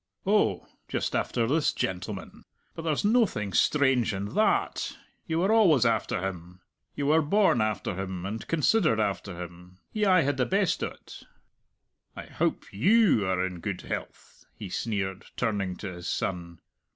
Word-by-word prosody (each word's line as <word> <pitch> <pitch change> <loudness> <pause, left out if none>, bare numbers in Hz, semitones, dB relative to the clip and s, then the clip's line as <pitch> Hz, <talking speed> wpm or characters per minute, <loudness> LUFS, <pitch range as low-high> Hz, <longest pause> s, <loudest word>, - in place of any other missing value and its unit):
"Oh, 210 +2 +2 0.2
just - - -2
after 115 - 0
this 145 +6 +2
gentleman! 95 +2 -4 0.3
But - - -7
there's 160 +2 -1
noathing 205 - +2
strange 130 - +3
in 100 +2 -5
tha - - +3 0.2
at; - - -6 0.3
you 160 -1 -1
were 190 +5 +2
always 175 - +5
after 110 -5 0
him. 90 -1 -9 0.3
You 145 - -2
were 155 +3 +4
born 185 - +3
after 110 -3 -1
him, 95 -1 -5
and 110 +3 -5
considered 165 - +2
after 100 -3 -2
him; 90 +1 -13
he 215 - -1
aye 185 -2 +5
had 145 -2 0
the 125 - +1
best 195 -1 +1
o't. - - -7 0.9
I - - -7
howp - - -2
you 170 - +4
are 95 0 +1
in 90 -2 -5
good 90 +1 -4
health?" - - -7
he 100 - -8
sneered, 95 -2 -3
turning 100 -6 -1
to 95 0 -6
his 90 -1 -8
son. 85 -2 -3
110 Hz, 160 wpm, -27 LUFS, -, 0.9 s, always